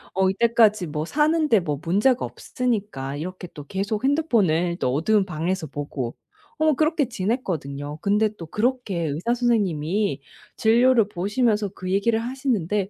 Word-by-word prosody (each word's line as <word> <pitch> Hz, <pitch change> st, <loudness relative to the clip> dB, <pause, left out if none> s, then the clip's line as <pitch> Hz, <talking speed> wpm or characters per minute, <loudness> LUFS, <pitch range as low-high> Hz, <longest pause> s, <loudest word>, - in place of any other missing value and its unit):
어 190 Hz, 0 st, +3 dB
이때까지 215 Hz, -3 st, +3 dB
뭐 150 Hz, +1 st, -3 dB
사는데 300 Hz, -, +2 dB
뭐 150 Hz, -5 st, -3 dB
문제가 210 Hz, +9 st, +2 dB
없으니까 205 Hz, -, -3 dB
이렇게 180 Hz, +3 st, -6 dB
또 145 Hz, -1 st, -9 dB
계속 205 Hz, +4 st, -2 dB
핸드폰을 200 Hz, -, +2 dB
또 125 Hz, -, 0 dB
어두운 195 Hz, +7 st, +2 dB
방에서 170 Hz, 0 st, -2 dB
보고. 140 Hz, -3 st, -4 dB, 0.5 s
어 315 Hz, -, +2 dB
뭐 310 Hz, -, +4 dB
그렇게 310 Hz, -1 st, +1 dB
지냈거든요. 165 Hz, -, -3 dB
근데 210 Hz, +2 st, +2 dB
또 165 Hz, -4 st, -9 dB
그렇게 240 Hz, 0 st, -1 dB
의사 165 Hz, +12 st, -1 dB
선생님이 200 Hz, -, 0 dB, 0.3 s
진료를 235 Hz, 0 st, +4 dB
보시면서 205 Hz, +3 st, 0 dB
그 185 Hz, -1 st, -6 dB
얘기를 220 Hz, +3 st, +2 dB
하시는데 225 Hz, -, -1 dB
205 Hz, 340 characters per minute, -23 LUFS, 165-235 Hz, 0.5 s, 뭐